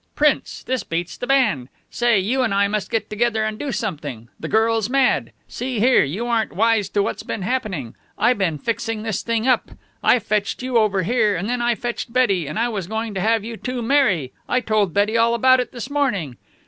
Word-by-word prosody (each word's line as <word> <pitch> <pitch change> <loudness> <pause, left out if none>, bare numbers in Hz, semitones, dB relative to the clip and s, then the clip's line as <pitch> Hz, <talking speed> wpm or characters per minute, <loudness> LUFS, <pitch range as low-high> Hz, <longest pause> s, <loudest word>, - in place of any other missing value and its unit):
Prince, 300 -1 +1
this 260 -1 -2
beats 170 +1 -3
the 245 - -6
band. 250 - +2 0.2
Say, 240 -4 +2
you 240 +8 0
and 225 -6 +1
I 200 0 +3
must 205 -2 -2
get 225 -2 -1
together 220 +1 0
and 215 0 -3
do 285 - -3
something. 150 - -4
The - - -5
girl's 225 0 +2
mad. 270 0 +2 0.2
See 250 -1 -4
here, 250 +4 +5
you 180 +12 -3
aren't 230 -2 0
wise 220 -1 +2
to 200 - +1
what's - - -3
been 200 - -5
happening. 185 - -3 0.2
I 240 +4 +4
been 185 -8 -1
fixing 225 +3 -3
this 220 -4 -2
thing 230 +1 -1
up. 255 - +2 0.3
I - - +5
fetched 215 +1 -2
you 255 -2 +2
over 200 -3 +1
here, 215 0 +2
and 185 +4 -3
then 245 +1 -1
I 240 0 +2
fetched 240 0 -4
Betty, 200 - +2
and 150 - -5
I 230 +2 +2
was 200 -7 -4
going 220 +1 -3
to 190 - -2
have 225 +1 +2
you 230 0 -6
two 250 0 -4
marry. 220 - +2 0.2
I 250 - +2
told 215 -6 +1
Betty 205 +5 +1
all 230 +1 +3
about 255 +2 +5
it 250 - -2
this 240 -3 -6
morning." 205 - -1
225 Hz, 215 wpm, -21 LUFS, 200-240 Hz, 0.3 s, here